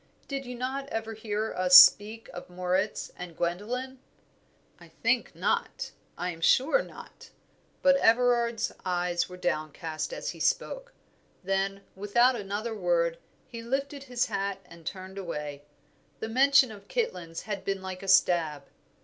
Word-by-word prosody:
Did 275 -2 -4
you 250 - -6
not 265 +3 -3
ever 225 0 -4
hear 215 0 -3
us 180 0 +8
speak 215 +4 +7
of 175 - -9
Moritz 185 +3 -1
and 175 -2 -9
Gwendoline." 240 +10 -3 0.8
"I - - -14
think - - -1
not 470 - -1 0.3
I 180 +1 -2
am 165 -1 -11
sure 275 - +4
not." - - -12 0.5
But 275 0 +6
Everard's 235 -1 +2
eyes 175 -1 -1
were 180 - -9
downcast 155 - -3
as - - -4
he - - -12
spoke. - - -1 0.5
Then, 195 +1 -1
without 240 +6 +3
another 210 +2 -4
word, 170 -4 0 0.3
he 230 -2 -9
lifted 275 +3 -3
his 245 -2 0
hat 200 -2 -2
and 170 -2 -14
turned 190 0 -6
away; 150 -5 -6 0.5
the 220 - -4
mention 265 +1 +5
of 200 -2 -12
Kitlands 180 - -3
had 205 -3 -5
been 195 -1 -3
like 185 -1 -6
a 195 - -8
stab. 165 -6 +3
200 Hz, 145 wpm, -28 LUFS, 180-245 Hz, 0.8 s, us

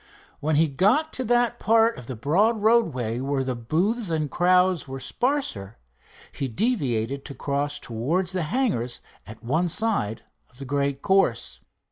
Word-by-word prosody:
When 155 +1 0
he 160 +2 +4
got 210 - +2
to 260 - -1
that 240 0 +2
part 225 +1 +3
of 120 - -12
the 130 - -5
broad 200 - +1
roadway 140 - +2
where 135 0 -1
the 130 -1 -2
booths 180 - -1
and 155 -4 -1
crowds 180 -2 +2
were 135 0 -6
sparser, 130 - -2 0.5
he 135 - -3
deviated 135 - -1
to 140 - -7
cross 145 +1 -2
towards 155 +11 -2
the 185 -1 -1
hangars 205 - -1 0.3
at 110 +1 -12
one 160 +9 0
side 175 - +1 0.3
of 125 - -23
the 135 - -8
great 140 0 -1
course. 190 -12 +1
155 Hz, 155 wpm, -24 LUFS, 130-215 Hz, 0.5 s, he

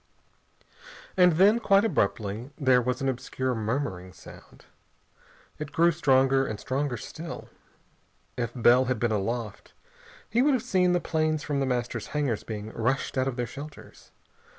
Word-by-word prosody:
And 180 -2 +5
then, 200 +7 +5
quite 200 -2 +4
abruptly, 105 - -1
there 130 -4 +4
was 125 +2 -2
an - - 0
obscure 130 0 -2
murmuring 110 -5 -3
sound. - - -15 0.9
It 150 -1 -6
grew 170 +1 +4
stronger, 135 -4 +3
and 105 - -5
stronger 135 -1 -2
still. 165 +10 -8 0.9
If 120 -2 -2
Bell 125 +1 +5
had 130 -1 -1
been 120 +1 0
aloft, 110 +1 -3 0.5
he 235 - +1
would 280 0 +4
have 250 - -2
seen 180 -1 +2
the 175 - +2
planes 155 -2 0
from 145 -2 -2
The 135 - 0
Master's 125 -2 -2
hangars 130 -8 0
being 110 -1 -6
rushed 125 +5 -1
out 130 0 +1
of 135 - -2
their 120 -1 -2
shelters. 145 +6 -11
130 Hz, 150 wpm, -27 LUFS, 120-155 Hz, 0.9 s, And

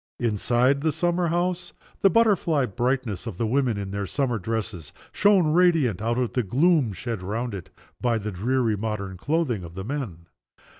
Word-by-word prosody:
Inside 120 +4 +2
the 160 +1 +1
summer 175 +2 0
house 175 +1 -1 0.3
the 195 - +6
butterfly 195 - +3
brightness 120 -2 -2
of 105 -6 -6
the 115 - 0
women 120 -1 +1
in 100 -1 -4
their 100 0 -3
summer 125 -3 -1
dresses 105 -5 -4 0.2
shone 185 -6 +3
radiant 160 - +3
out 115 +2 0
of 125 -2 -1
the 125 - +1
gloom 135 - +2
shed 110 +2 -5
round 110 +5 -3
it 95 -3 -7 0.3
by 120 -2 +2
the 105 0 -4
dreary 115 +4 0
modern 100 -2 -4
clothing 135 - -1
of 85 0 -10
the 95 0 -5
men. 110 - -5
120 Hz, 170 wpm, -25 LUFS, 105-150 Hz, 0.3 s, the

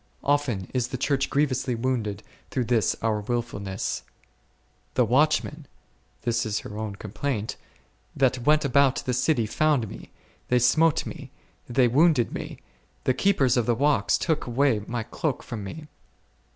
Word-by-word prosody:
Often 135 -10 0
is 125 -2 0
the 130 - -4
Church 135 +1 0
grievously 130 -3 0
wounded 115 -4 -2 0.3
through 130 - -1
this 115 -4 +2
our 110 -2 +1
wilfulness: 105 -4 -3 0.9
the - - +4
watchmen, 150 +2 +1 0.6
this 120 0 +1
is 110 -1 -2
her 105 - -9
own 105 -2 -4
complaint, 110 +2 -3 0.6
that 130 -1 +2
went 150 +4 +3
about 140 0 +3
the 125 - 0
city 125 -1 +2
found 140 0 +1
me, - - -10 0.4
they 125 - +3
smote 150 +6 +3
me, - - -8 0.4
they 125 0 +4
wounded 140 -1 +3
me; - - -6 0.5
the 130 - +2
keepers 135 -8 +2
of 120 - +1
the 120 - +3
walls 145 +4 +2
took 160 -5 -1
away 125 -2 +2
my 120 -1 -2
cloak 150 +4 -3
from 110 -4 -6
me. 155 +11 -7
125 Hz, 150 wpm, -26 LUFS, 115-140 Hz, 0.9 s, the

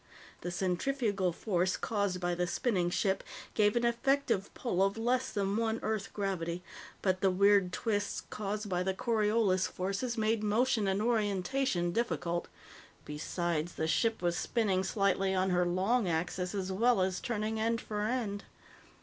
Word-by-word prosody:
The 175 - -3
centrifugal 195 +2 0
force 185 0 0
caused 200 -4 -1
by 175 -1 0
the 175 0 0
spinning 185 -5 0
ship 190 +2 0 0.3
gave 210 0 +3
an 240 0 +2
effective 235 -3 +1
pull 190 -7 -1
of 195 +2 +2
less 250 +3 +1
than 200 0 0
one 225 0 0
Earth 215 -2 -2
gravity, 180 -4 -2 0.4
but 185 -1 +1
the 195 - +4
weird 200 0 +4
twists 205 +1 -1
caused 210 0 -3
by 180 -2 0
the 190 +1 -1
Coriolis 215 -4 +2
forces 200 +6 -3
made 220 0 +1
motion 215 +1 +2
and 195 +2 +1
orientation 210 -3 +1
difficult. 175 -6 -1 0.6
Besides, 165 +2 -2
the 160 - -1
ship 225 +3 +1
was 175 -1 +1
spinning 195 -3 +1
slightly 195 -1 +1
on 185 0 +1
her 180 0 +2
long 195 +5 +1
axis 180 +3 -1
as 190 -1 -2
well 230 +2 +3
as 185 0 -1
turning 220 -2 -2
end 230 +1 +1
for 210 -2 -4
end. 215 -3 -2
200 Hz, 155 wpm, -32 LUFS, 185-225 Hz, 0.6 s, the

